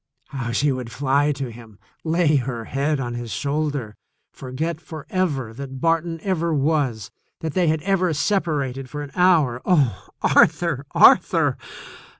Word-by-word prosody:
How 125 Hz, -4 st, -4 dB
she 140 Hz, +5 st, +1 dB
would 125 Hz, -3 st, -5 dB
fly 140 Hz, +3 st, +1 dB
to 135 Hz, -3 st, -5 dB
him, 110 Hz, -3 st, -14 dB, 0.3 s
lay 160 Hz, -2 st, +2 dB
her 120 Hz, -3 st, -3 dB
head 140 Hz, +4 st, -1 dB
on 120 Hz, -2 st, -3 dB
his 120 Hz, -1 st, -6 dB
shoulder, 140 Hz, -5 st, -2 dB, 0.4 s
forget 155 Hz, +6 st, -4 dB
forever 155 Hz, -, -3 dB
that 135 Hz, +1 st, -8 dB
Barton 165 Hz, +2 st, 0 dB
ever 170 Hz, -4 st, 0 dB
was, 135 Hz, -8 st, 0 dB, 0.3 s
that 160 Hz, -3 st, -3 dB
they 180 Hz, -2 st, +2 dB
had 155 Hz, -1 st, 0 dB
ever 185 Hz, -2 st, +1 dB
separated 145 Hz, -6 st, -1 dB
for 145 Hz, +3 st, -5 dB
an 145 Hz, -, -9 dB
hour. 160 Hz, -9 st, +3 dB
Oh, 135 Hz, -, +1 dB, 0.2 s
Arthur! 150 Hz, -3 st, +3 dB
Arthur! -, -, +5 dB
145 Hz, 145 wpm, -22 LUFS, 130-165 Hz, 0.4 s, Arthur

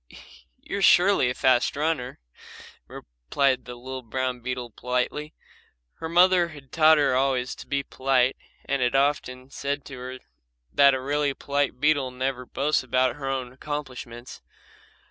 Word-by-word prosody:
"You 200 Hz, -, -4 dB
are -, -, -4 dB
surely 180 Hz, -7 st, +5 dB
a 125 Hz, -, -3 dB
fast 130 Hz, -2 st, +2 dB
runner," 145 Hz, -4 st, -2 dB, 0.7 s
replied 125 Hz, -, -2 dB
the 125 Hz, -, -8 dB
little 130 Hz, +2 st, -7 dB
brown 130 Hz, +1 st, -3 dB
beetle 125 Hz, -1 st, -5 dB
politely. 125 Hz, +6 st, -3 dB, 0.6 s
Her 160 Hz, -, -5 dB
mother 180 Hz, +1 st, +5 dB
had 145 Hz, -5 st, -13 dB
taught 160 Hz, 0 st, +5 dB
her 145 Hz, -3 st, +2 dB
always 130 Hz, -1 st, 0 dB
to -, -, -11 dB
be 140 Hz, 0 st, -1 dB
polite 130 Hz, -1 st, +1 dB, 0.3 s
and 140 Hz, -1 st, -1 dB
had 125 Hz, +1 st, +1 dB
often 135 Hz, -2 st, 0 dB
said 140 Hz, -1 st, -3 dB
to 135 Hz, -, -9 dB
her 130 Hz, +1 st, -7 dB, 0.6 s
that 140 Hz, -1 st, +6 dB
a -, -, -3 dB
really 145 Hz, +1 st, -1 dB
polite 140 Hz, -2 st, -1 dB
beetle 145 Hz, -2 st, +2 dB
never 125 Hz, 0 st, -3 dB
boasts 145 Hz, +4 st, 0 dB
about 130 Hz, +1 st, 0 dB
her 135 Hz, -2 st, -4 dB
own 130 Hz, -2 st, -3 dB
accomplishments. 130 Hz, -4 st, -7 dB
135 Hz, 150 wpm, -25 LUFS, 125-145 Hz, 0.7 s, that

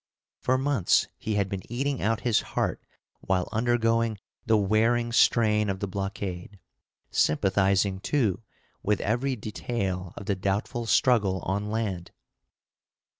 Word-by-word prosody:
For 130 Hz, +1 st, +1 dB
months 135 Hz, -7 st, +2 dB
he 110 Hz, -, -3 dB
had 100 Hz, -2 st, +1 dB
been 95 Hz, -1 st, -4 dB
eating 135 Hz, +2 st, -1 dB
out 115 Hz, +2 st, 0 dB
his 120 Hz, -3 st, +2 dB
heart -, -, -2 dB, 0.4 s
while 95 Hz, -2 st, 0 dB
undergoing 115 Hz, -1 st, +1 dB, 0.3 s
the 110 Hz, -2 st, +5 dB
wearing 115 Hz, +4 st, +2 dB
strain 105 Hz, -3 st, +3 dB
of 95 Hz, -1 st, -2 dB
the 100 Hz, -, -1 dB
blockade; 95 Hz, 0 st, -5 dB, 0.5 s
sympathizing, 95 Hz, +3 st, +2 dB
too, 110 Hz, -4 st, 0 dB, 0.4 s
with 105 Hz, -1 st, +1 dB
every 125 Hz, +5 st, 0 dB
detail 100 Hz, -5 st, -4 dB
of 100 Hz, -, -7 dB
the 100 Hz, -, +1 dB
doubtful 100 Hz, +5 st, -2 dB
struggle 100 Hz, -4 st, +3 dB
on 100 Hz, +2 st, -2 dB
land. 100 Hz, -6 st, -2 dB
105 Hz, 125 wpm, -27 LUFS, 95-115 Hz, 0.5 s, the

